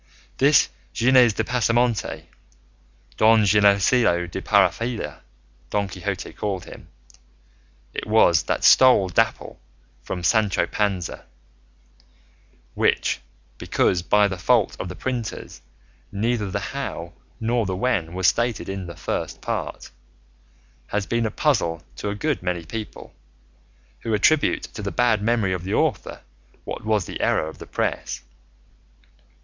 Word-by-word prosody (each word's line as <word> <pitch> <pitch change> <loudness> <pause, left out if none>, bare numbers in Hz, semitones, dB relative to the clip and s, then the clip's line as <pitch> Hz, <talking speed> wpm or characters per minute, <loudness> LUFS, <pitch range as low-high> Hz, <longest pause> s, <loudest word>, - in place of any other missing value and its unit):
This 140 +3 +5 0.2
Gines 125 -1 +5
de 110 - -1
Pasamonte 120 0 0 0.9
Don 110 0 +5
Ginesillo 100 -1 +3
de 85 - -6
Parapilla, 115 0 +1 0.5
Don 100 -1 0
Quixote 95 0 -5
called 100 -4 -4
him - - -12 1.1
it - - -5
was 105 -6 +4
that - - -1
stole 125 -8 +6
Dapple 90 - 0 0.4
from 90 -2 -5
Sancho 105 +1 +2
Panza; 100 -5 -2 1.5
which, - - +1 0.4
because 90 - +1
by 105 +4 +3
the 95 -2 -5
fault 115 +1 +2
of 90 - -4
the 90 - -7
printers 125 -1 -5 0.5
neither 110 0 -1
the 100 +1 -4
how 85 -11 -5 0.3
nor 115 -1 0
the 95 - -2
when 90 -6 -1
was 95 0 -1
stated 120 +3 +1
in 95 -2 -5
the 85 - -8
First - - -4
Part, - - -5 1.0
has 105 -1 -2
been 115 +1 0
a - - -2
puzzle 105 - 0
to 105 - -3
a 100 - -3
good 145 +4 -1
many 90 -2 -3
people, 110 +5 -8 0.9
who 110 - -1
attribute 145 +8 +2
to - - -8
the 100 - -3
bad 120 -4 +2
memory 110 -3 +1
of 90 -2 -4
the 95 - -2
author - - -1 0.4
what - - -6
was 105 -4 +1
the - - -6
error - - +1
of 80 - -10
the - - -10
press. - - -3
105 Hz, 130 wpm, -23 LUFS, 95-120 Hz, 1.5 s, stole